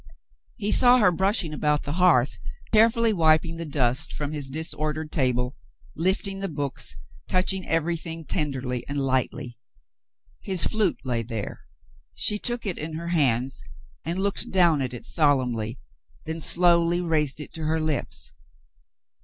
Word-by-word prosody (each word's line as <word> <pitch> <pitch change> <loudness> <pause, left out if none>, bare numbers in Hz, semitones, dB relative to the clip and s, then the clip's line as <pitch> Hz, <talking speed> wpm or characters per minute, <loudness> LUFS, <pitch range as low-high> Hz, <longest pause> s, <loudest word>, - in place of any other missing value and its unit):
He 205 +1 -2
saw 250 +2 +7
her 210 -6 +4
brushing 190 -2 0
about 150 0 0
the 145 - -4
hearth, 145 - +3 0.3
carefully 225 +1 +4
wiping 160 -1 +2
the 165 -1 -5
dust 130 -4 +1
from 145 0 -4
his 145 -3 -4
disordered 155 +1 -3
table, 125 -2 0 0.4
lifting 190 +3 0
the 195 - -2
books, 145 -4 -3 0.3
touch 185 +1 +1
ing 190 -1 -6
everything 165 0 -2
tenderly 130 -5 -3
and 145 0 -2
lightly. 130 -2 -2 0.8
His 190 -3 +2
flute 215 -5 +1
lay 125 -3 -1
there. 115 -3 -6 0.5
She 210 - +4
took 240 0 -2
it 190 -4 -3
in 155 +1 -5
her 170 +2 -5
hands 130 - +1 0.4
and 170 - -3
looked 200 +1 -1
down 170 -6 +3
at 130 -2 -2
it 120 - -9
solemnly, 125 -7 0 0.5
then 160 +1 -4
slowly 170 0 +3
raised 155 -5 0
it 150 - -8
to 160 -2 -2
her 160 +1 0
lips. 155 -2 -3
155 Hz, 145 wpm, -25 LUFS, 135-180 Hz, 0.8 s, saw